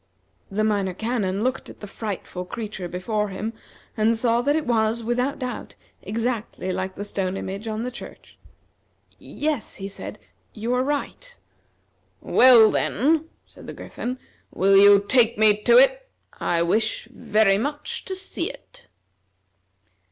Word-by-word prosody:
The 215 +2 -1
Minor 200 -4 0
Canon 210 -3 -1
looked 255 +1 -2
at - - -13
the - - -8
frightful 200 -3 -6
creature 205 -2 -6
before 210 +4 -2
him 210 +4 -4 0.4
and 225 +1 +2
saw 235 0 +2
that 285 +4 +1
it 315 - -1
was, 230 -1 +1
without 245 +4 -1
doubt, 255 -2 -6 0.3
exactly 225 -4 -3
like 185 +1 -3
the 205 - -5
stone 195 -2 -3
image 195 +4 -6
on 220 +1 -3
the 250 - -4
church. - - -12 0.8
"Yes," 295 -5 -3
he 195 - -6
said, 200 - -7 0.4
"you 230 +3 -2
are 250 - +2
right." 295 - -4 0.8
"Well, 240 -4 +6
then," 315 +7 +1 0.2
said - - -15
the - - -6
Griffin, 250 +1 -6 0.3
"will 195 +1 +3
you 200 0 +7
take 235 -2 +4
me 210 -1 +4
to 475 - +5
it? - - +4 0.3
I 170 -1 +1
wish 215 +6 0
very 205 -2 +2
much 290 +5 -4
to 380 - -4
see 380 +1 -4
it." - - -14
220 Hz, 145 wpm, -23 LUFS, 200-255 Hz, 0.8 s, you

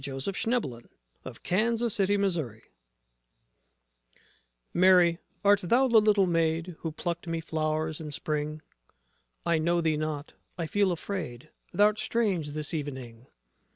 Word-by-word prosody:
JOSEPH 140 - -2
AND 245 +1 +3
MARY 120 -3 -7 1.0
JOSEPH 190 - 0 2.0
Mary, 180 -2 +5 0.3
art 205 0 +5
thou 240 +9 +3
the 230 -3 +6
little 210 -2 +4
maid 165 0 0
Who 165 - -4
plucked 170 +2 -4
me 165 0 -2
flowers 155 -1 -2
in 155 - -6
Spring? 155 +1 -3 0.8
I 170 -1 +2
know 170 +2 +2
thee 160 -2 +1
not: 155 -1 -4 0.2
I 170 - -2
feel 200 +3 +2
afraid: 160 -6 -5 0.2
Thou'rt 210 +1 +4
strange 190 -11 0
this 150 +2 -4
evening. 130 -6 -6
165 Hz, 120 wpm, -28 LUFS, 155-195 Hz, 2.0 s, the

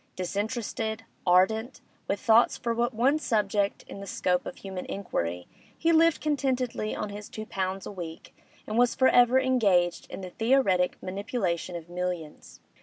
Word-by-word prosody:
Disinterested, 220 +3 -3 0.2
ardent, 220 +8 +3 0.3
with 200 - -1
thoughts 225 +3 +4
for 235 -1 -1
but 240 +2 0
one 260 +6 +2
subject 205 -6 0
in - - -9
the 200 - -8
scope 180 -1 0
of - - -6
human 190 -2 -6
inquiry, 90 - -3 0.3
he 330 - +2
lived 330 0 +4
contentedly 260 -7 -1
on 210 - -3
his 205 +1 -8
two 215 - -7
pounds 190 -2 -3
a - - -6
week, 170 -4 -8 0.3
and 220 +2 -1
was 245 -1 +3
for 260 - +5
ever 245 +1 +5
engaged 200 -10 +2
in - - -7
the 185 -1 -7
theoretic 225 -7 +2
manipulation 185 -3 -2
of 170 -1 -7
millions. 175 -3 -5
205 Hz, 160 wpm, -27 LUFS, 180-245 Hz, 0.3 s, for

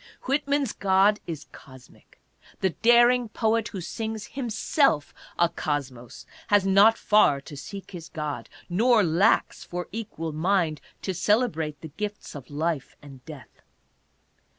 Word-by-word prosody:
Whitman's 280 -1 0
God 200 +2 +3
is 160 -4 -6
cosmic. 130 -3 -17 0.4
The 190 - +2
daring 240 +3 +4
poet 225 0 0
who 195 -4 -6
sings 220 +4 -5
himself 240 - +1 0.2
'a 170 - +4
cosmos 140 -7 -5 0.2
has 205 -2 +3
not 200 +4 +5
far 210 -10 +4
to 145 - -11
seek 195 +7 -9
his 170 -4 -9
God, 150 -2 -5 0.2
nor 220 +5 +3
lacks 180 +6 +2
for 180 0 -5
equal 200 -7 -5
mind 165 -1 0 0.2
to 190 - -2
celebrate 180 - 0
the 160 - -8
gifts 210 +6 -6
of 135 -4 -10
life 155 -1 -3
and 135 -3 -13
death. 150 -5 -12
190 Hz, 130 wpm, -26 LUFS, 155-220 Hz, 0.4 s, not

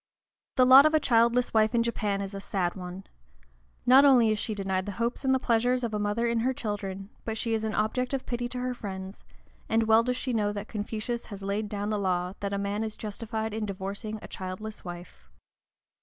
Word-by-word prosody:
The 255 - +5
lot 265 +3 +9
of 310 - +1
a - - +5
childless 235 -1 +3
wife 220 +1 +3
in 230 - +3
Japan 210 -4 -1
is 195 0 -5
a 195 - -5
sad 185 -3 -2
one. 180 0 -7 0.8
Not 260 +3 +8
only 250 -6 +6
is 215 - 0
she 215 -1 -2
denied 190 -1 -1
the 205 - -3
hopes 235 +6 -2
and 265 - +2
the 265 - +4
pleasures 245 0 +1
of 230 -2 -2
a 210 - -1
mother 210 +3 0
in 235 -1 +1
her 255 +3 0
children, 200 -2 -4
but 225 -1 -3
she 230 0 -1
is 220 -1 0
an 220 0 -2
object 250 +4 0
of 270 -2 -2
pity 240 0 -2
to 250 - -7
her 250 0 -1
friends, 190 -4 -7 0.5
and 225 0 +3
well 220 0 +5
does 250 +1 -1
she 255 -1 -2
know 210 -2 +1
that 205 +1 -5
Confucius 220 +2 -4
has 200 -2 -8
laid 205 +2 -2
down 205 +1 -3
the 210 - 0
law 180 -1 0
that 200 -1 -3
a 200 - -1
man 200 +2 -2
is 220 -1 -5
justified 220 0 -4
in 215 -1 -2
divorcing 200 +3 -5
a - - -7
childless 190 +4 -6
wife. 175 - -10
215 Hz, 225 wpm, -28 LUFS, 200-235 Hz, 0.8 s, lot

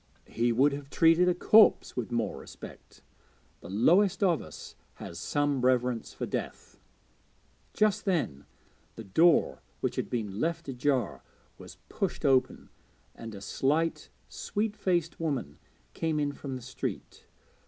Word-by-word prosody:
He 120 +1 +1
would 135 +5 +3
have 140 0 -7
treated 165 +3 +4
a 180 - +1
corpse 215 +4 +5
with 125 -1 -4
more 115 -2 -2
respect: - - -13 0.6
the 85 - -11
lowest 175 - +3
of 175 -5 +3
us 80 - -10 0.2
has 85 - -8
some 145 -2 0
reverence 125 -2 +1
for - - -5
death. - - -6 0.9
Just 215 -2 +1
then 150 - -1 0.5
the 115 - -8
door, 160 - +3 0.2
which - - -2
had - - -2
been 105 -4 -3
left 165 +2 -2
ajar, 125 - -1 0.4
was - - -12
pushed - - -3
open, 130 -2 +2 0.4
and 115 -2 -9
a 100 - -9
slight, 150 +10 -1 0.2
sweet 215 0 -3
faced 175 -6 -1
woman 150 -6 -3 0.3
came 160 -2 -1
in 145 -1 0
from 140 -2 -7
the 125 - -8
street. 130 +2 -6
140 Hz, 140 wpm, -29 LUFS, 120-170 Hz, 0.9 s, corpse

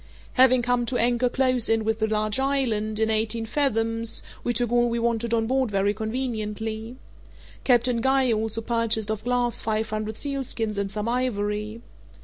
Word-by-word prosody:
Having 255 -1 +5
come 245 0 +1
to 250 - -1
anchor 240 +1 +2
close 255 -2 +2
in 225 0 +2
with 220 0 -1
the 220 - +1
large 215 +2 0
island, 230 -6 0
in 220 0 +2
eighteen 220 +1 0
fathoms, 225 -3 0 0.2
we 245 - 0
took 240 0 -1
all 240 0 +3
we 235 - -1
wanted 235 0 -1
on 225 -1 +1
board 260 +1 +1
very 200 0 +1
conveniently. 220 -1 -4 0.7
Captain 245 -2 +2
Guy 265 0 +2
also 220 +1 -1
purchased 225 -2 0
of 215 -1 -4
Glass 245 0 +2
five 220 0 -2
hundred 215 0 -3
sealskins 245 -6 -2
and 200 -1 -2
some 210 +2 -3
ivory. 215 -3 -2
225 Hz, 165 wpm, -25 LUFS, 215-245 Hz, 0.7 s, Having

